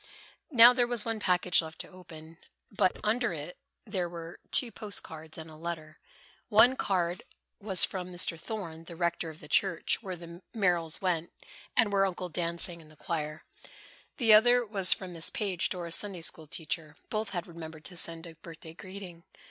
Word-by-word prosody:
Now 245 -4 +9
there 245 -1 +2
was 240 -3 0
one 225 -1 -1
package 180 -3 +3
left 160 0 -9
to - - -9
open, 165 -3 -13 0.3
but 190 -2 +2
under 230 -1 +1
it 155 +3 -7 0.3
were 175 -4 -4
two 245 -3 +4
post 205 -1 -2
cards 160 0 -8
and 160 0 -8
a 155 - -12
letter. 155 -1 -6 0.5
One 240 +4 +7
card 180 -6 0 0.4
was 195 -4 +5
from 185 -2 -1
Mr. 175 -2 -1
Thorne, 170 -5 -6
the 170 - -9
rector 170 -1 -1
of 160 0 -11
the 150 - -10
church 170 +4 +1
where 190 -4 -5
the 170 +1 -11
Merrills 175 -5 +2
went 175 -3 0 0.5
and 225 -4 +4
where 195 0 +4
Uncle 180 -1 -4
Dan 170 0 -2
sang 170 -1 -1
in 155 - -17
the 155 - -17
choir. 155 0 -4 0.7
The 225 -5 +5
other 245 +3 +6
was 195 -4 +4
from 185 -2 0
Miss 165 -1 +1
Page, 195 -5 -1
Dora's 170 -2 -1
Sunday 195 -4 -4
school 160 -1 0
teacher. 155 0 -4 0.2
Both 215 -1 -1
had 175 -4 -3
remembered 160 -2 -10
to 180 - -1
send 165 0 -2
a 165 - -10
birthday 160 0 -11
greeting. 185 -2 -9
175 Hz, 180 wpm, -30 LUFS, 165-200 Hz, 0.7 s, Now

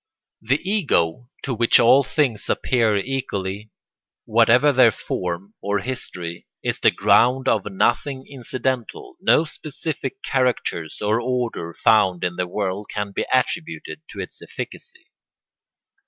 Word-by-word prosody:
The 135 +10 -1
Ego 125 - +1
to 135 - -2
which 115 0 +5
all 125 +4 +6
things 135 -5 -1
appear 115 -5 +2
equally, 105 -4 -3 0.6
whatever 120 +6 +4
their 130 -2 +6
form 95 -1 -4
or 100 +1 0
history, 90 -9 -6 0.2
is - - -1
the - - +5
ground 130 +2 +3
of 105 -4 +1
nothing 130 +7 0
incidental: 130 - -4
no 160 - +4
specific 160 - -5
characters 125 - -1
or 110 +3 +1
order 120 -9 -3
found 100 -5 +3
in 90 -1 -1
the 90 0 -2
world 100 +1 -3
can 105 -1 -3
be - - -3
attributed 160 +5 -1
to - - -9
its - - -7
efficacy. 380 -6 -9
120 Hz, 125 wpm, -22 LUFS, 100-135 Hz, 0.6 s, all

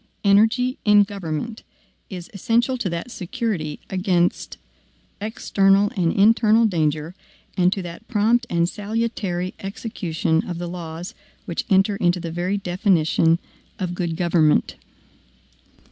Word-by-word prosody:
Energy 225 +5 +3
in 210 -1 +6
government 200 +2 -5 0.5
is 180 -3 -7
essential 235 +6 +1
to 240 -7 -2
that 170 +8 -5
security 185 - -3
against 185 -2 0 0.6
external 200 -2 +2
and 170 -3 +1
internal 225 +2 +4
danger, 155 -4 0 0.4
and 180 0 +3
to 195 -1 -2
that 175 +5 -9
prompt 230 +2 +2
and 170 0 +1
salutary 205 -3 -3
execution 175 -5 -2
of 175 - -4
the 175 - -4
laws 170 0 -7 0.3
which 170 - -3
enter 195 +1 +3
into 175 -1 +1
the 170 -1 -5
very 180 +4 -1
definition 175 -4 +2 0.4
of 180 -2 -3
good 175 -2 -2
government. 170 -3 +2
185 Hz, 120 wpm, -22 LUFS, 170-210 Hz, 0.6 s, in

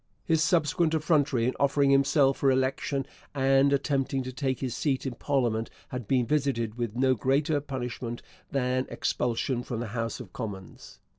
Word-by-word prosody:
His 160 -1 +2
subsequent 160 0 +2
effrontery 145 -6 +2
in 125 - +1
offering 140 0 +3
himself 135 0 +4
for 135 - +3
election 135 +1 0 0.3
and 135 +1 +4
attempting 135 -1 0
to 130 0 -6
take 130 -1 -1
his 125 -3 -3
seat 140 -3 -1
in 130 - -2
parliament 120 -4 0 0.2
had 125 -4 -5
been 125 -1 +2
visited 130 -5 0
with 120 -3 -3
no 130 +1 +3
greater 140 +5 +1
punishment 125 -3 -5 0.3
than 130 -1 0
expulsion 120 +1 -1
from 120 -2 -4
the 120 -2 -4
House 115 0 -2
of 115 -7 -10
Commons. 100 -6 -8
130 Hz, 160 wpm, -28 LUFS, 120-140 Hz, 0.3 s, himself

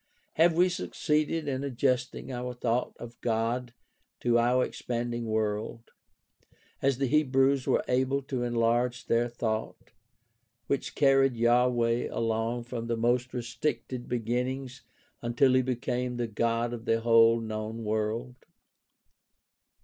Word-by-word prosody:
Have 165 +1 +4
we 180 +2 +5
succeeded 155 -3 -1
in 135 -1 -2
adjusting 130 -1 -1
our 125 0 -4
thought 120 0 -1
of 120 0 -11
God 115 +2 -1 0.5
to 120 -1 +3
our 125 +2 +3
expanding 120 -1 -4
world, 110 +1 -2 0.9
as 135 -2 +2
the 135 - 0
Hebrews 135 -1 +2
were - - +2
able 130 +2 +1
to 130 -2 -3
enlarge 120 +1 0
their 120 +1 +2
thought, 110 -2 -4 0.7
which 140 - -2
carried 135 -2 +4
Yahweh 120 0 +2
along 115 +1 -1
from 115 -1 -5
the 115 -1 -1
most 120 +2 +1
restricted 125 +1 -3
begin 120 +1 0
nings 130 -1 -6 0.4
until 120 +3 +3
he 130 - +5
became 125 -1 -2
the 120 - -1
God 115 +2 -1
of 115 -1 -7
the 115 0 +1
whole 115 0 +5
known 110 0 -5
world 110 +3 -2
120 Hz, 125 wpm, -28 LUFS, 115-130 Hz, 0.9 s, we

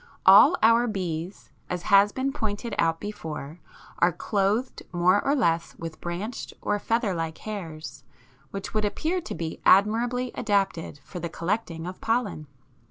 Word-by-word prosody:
All - - +8
our 230 +2 +5
bees, 180 -3 -4 0.2
as 180 -1 -3
has 200 +1 +5
been 270 +3 -2
pointed 220 -2 -3
out 165 0 +2
before, 160 -6 -6 0.4
are 175 - +4
clothed 210 +7 -1
more 180 +3 +3
or 280 - +2
less 170 - 0
with 165 -1 -8
branched 185 +7 -5
or 205 0 -1
feather 225 -2 0
like 165 -2 -3
hairs, 165 -8 -7 0.5
which 195 -1 -6
would 215 -1 +1
appear 320 - -1
to 355 - -6
be 165 -1 -5
admirably 235 +6 +3
adapted 195 -8 -1
for 180 - -8
the 170 0 -4
collecting 170 -1 -3
of 185 +1 -7
pollen. 220 -10 -1
200 Hz, 150 wpm, -26 LUFS, 170-225 Hz, 0.5 s, All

